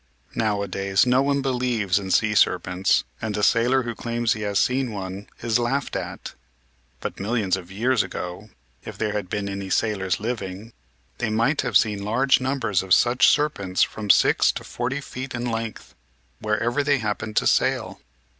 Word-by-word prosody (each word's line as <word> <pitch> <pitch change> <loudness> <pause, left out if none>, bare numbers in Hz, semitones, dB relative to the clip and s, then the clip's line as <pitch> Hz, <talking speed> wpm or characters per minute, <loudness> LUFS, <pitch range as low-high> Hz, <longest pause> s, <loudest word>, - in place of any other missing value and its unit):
Nowadays 100 -2 0
no 125 +1 +3
one 140 0 +1
believes 120 -7 0
in 95 -1 -6
sea 105 +3 +2
serpents, 90 -2 +2 0.2
and 110 -1 -3
a 105 - -1
sailor 120 +5 +3
who 120 -1 -4
claims 120 0 -1
he 110 - -7
has 100 -1 -1
seen 130 -1 +1
one 95 0 -6 0.2
is 115 0 +2
laughed 135 +3 -1
at. - - -5 0.7
But - - -5
millions 100 -2 0
of 95 -1 -9
years 115 +4 +1
ago, 95 +2 -6 0.3
if - - -8
there 105 -1 -1
had 105 -4 -3
been 105 0 -2
any 100 -1 -5
sailors 95 -3 0
living, 110 -1 -5 0.5
they 115 - -1
might 115 +8 +1
have - - +3
seen 105 -3 0
large 130 +6 +2
numbers 130 -7 0
of 95 -1 +4
such 125 +1 +4
serpents 100 -12 +2
from 105 -2 -4
six - - +5
to - - -6
forty 130 +4 -3
feet 130 -1 -7
in 120 0 -3
length, 115 -2 -4 0.5
wherever 115 +6 0
they 145 0 +2
happened 110 -1 -3
to - - +3
sail. - - +1
110 Hz, 170 wpm, -23 LUFS, 100-125 Hz, 0.7 s, six